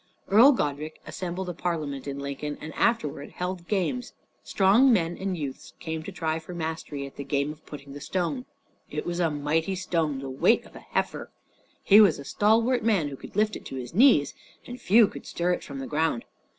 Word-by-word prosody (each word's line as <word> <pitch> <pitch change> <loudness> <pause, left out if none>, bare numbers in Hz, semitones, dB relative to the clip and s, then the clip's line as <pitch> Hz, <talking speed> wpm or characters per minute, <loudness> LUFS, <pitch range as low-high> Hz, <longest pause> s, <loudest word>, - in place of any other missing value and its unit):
Earl 235 +8 +8
Godrich 150 - -2
assembled 185 +1 -4
a 180 - -3
Parliament 155 -6 -3
in 140 0 -4
Lincoln, 140 +1 -4
and 155 0 -8
afterward 150 -11 0
held 180 -1 -4
games. 210 +5 -1 0.3
Strong 210 +7 +4
men 175 -6 +2
and 190 -2 -3
youths 140 -4 -6
came 160 -1 -4
to - - -7
try 160 -1 -2
for 170 +2 -9
mastery 160 -4 -4
at 140 - -12
the 140 - -4
game 140 +1 -1
of 155 +1 -13
putting 140 -2 -9
the 145 - -9
stone. 190 - -2 0.4
It - - -4
was 175 0 -3
a 170 -2 +2
mighty 155 +5 0
stone, 165 -6 -1
the 135 0 -6
weight 130 0 +2
of - - -17
an - - -12
heifer. - - -2 0.5
He 205 +2 +8
was 195 -7 +5
a 140 - -9
stalwart 225 - +2
man 200 -10 +2
who 140 - -7
could - - -12
lift 215 +1 +2
it - - -8
to - - -7
his 125 -2 -6
knee, 225 - +6 0.4
and 245 0 -9
few 220 +2 +6
could - - -10
stir 175 +1 0
it - - -4
from 140 - -8
the 135 - -5
ground. 155 -5 0
165 Hz, 205 wpm, -26 LUFS, 145-195 Hz, 0.5 s, Earl